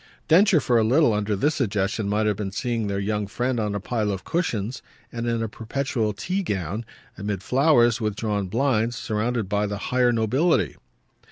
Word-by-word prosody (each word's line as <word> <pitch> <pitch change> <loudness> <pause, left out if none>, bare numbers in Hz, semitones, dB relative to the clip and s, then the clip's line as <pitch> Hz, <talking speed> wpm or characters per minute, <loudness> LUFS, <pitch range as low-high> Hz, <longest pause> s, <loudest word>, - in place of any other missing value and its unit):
Densher 180 +1 +5
for 120 -4 +2
a - - +3
little, 125 +2 +4
under 105 0 0
this 145 +10 +1
suggestion, 105 -4 -1
might 105 +1 +1
have 105 -1 +1
been 100 -1 -4
seeing 115 0 -2
their 100 0 -2
young 105 +1 -1
friend 120 +4 -1
on 105 -2 -1
a - - -1
pile 110 +1 -1
of 95 -1 -4
cushions 125 - -2 0.3
and 120 0 -4
in 115 -1 0
a - - -1
perpetual 115 0 -2
tea 180 - -2
gown, 105 - -3 0.3
amid 100 -1 -3
flowers 125 -3 +4
and 110 - -2
with 105 -2 -1
drawn 105 -2 -2
blinds, 120 +1 +1
surrounded 110 0 -2
by 105 +1 0
the 100 0 -3
higher 125 +3 +2
nobility. 125 +9 +1
110 Hz, 190 wpm, -24 LUFS, 105-125 Hz, 0.3 s, Densher